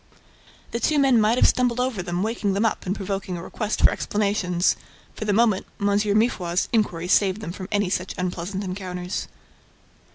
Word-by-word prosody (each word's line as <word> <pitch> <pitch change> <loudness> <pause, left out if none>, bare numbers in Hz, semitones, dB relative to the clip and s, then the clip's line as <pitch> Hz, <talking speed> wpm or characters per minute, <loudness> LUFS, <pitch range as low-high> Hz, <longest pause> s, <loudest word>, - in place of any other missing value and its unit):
The 235 - -2
two 305 +5 +2
men 265 -5 +5
might 215 +3 +3
have - - +6
stumbled 250 -1 +2
over 250 -6 0
them, 175 +1 -2
waking 215 -3 -1
them 200 +4 +1
up 220 - -1
and 190 - 0
provoking 195 -2 -4
a 170 - -7
request 215 +2 -3
for - - +7
explanations. 200 -4 0 0.4
For 215 - -5
the 210 - +1
moment, 215 -2 +2
M. 200 - +1 0.3
Mifroid's 185 -6 +1
inquiry 180 -6 +1
saved 195 +1 +3
them 205 -6 -5
from 185 +1 -7
any 205 -3 +1
such 185 -1 -2
unpleasant 180 +2 -3
encounters. 185 -1 -4
200 Hz, 175 wpm, -24 LUFS, 180-220 Hz, 0.4 s, for